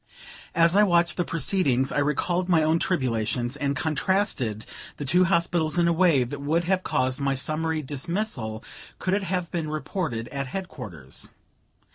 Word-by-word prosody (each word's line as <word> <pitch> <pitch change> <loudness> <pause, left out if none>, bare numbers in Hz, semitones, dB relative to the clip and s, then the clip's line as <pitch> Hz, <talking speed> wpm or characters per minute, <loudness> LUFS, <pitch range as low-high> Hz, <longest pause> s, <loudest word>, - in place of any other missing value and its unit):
As 170 +1 +4
I 205 - +6
watched 175 -4 +3
the 175 - 0
proceedings, 155 -5 +1
I - - 0
recalled 175 +5 0
my 160 -3 +4
own 160 +2 +2
tribulations, 120 - 0
and 140 -1 -1
contrasted 150 - 0 0.3
the 145 - -4
two 180 +7 +4
hospitals 170 -2 +1
in 170 -1 +4
a 170 - +3
way 165 -6 +4
that 140 +4 -6
would 160 +4 +1
have 185 +2 +1
caused 130 -5 0
my 140 -1 0
summary 155 +4 -1
dismissal, 140 - -2 0.3
could 185 - -1
it 205 - +2
have 180 -1 -2
been 165 -3 -2
reported 150 - -3
at 140 -1 -4
headquarters. 115 - -6
155 Hz, 160 wpm, -25 LUFS, 130-175 Hz, 0.3 s, I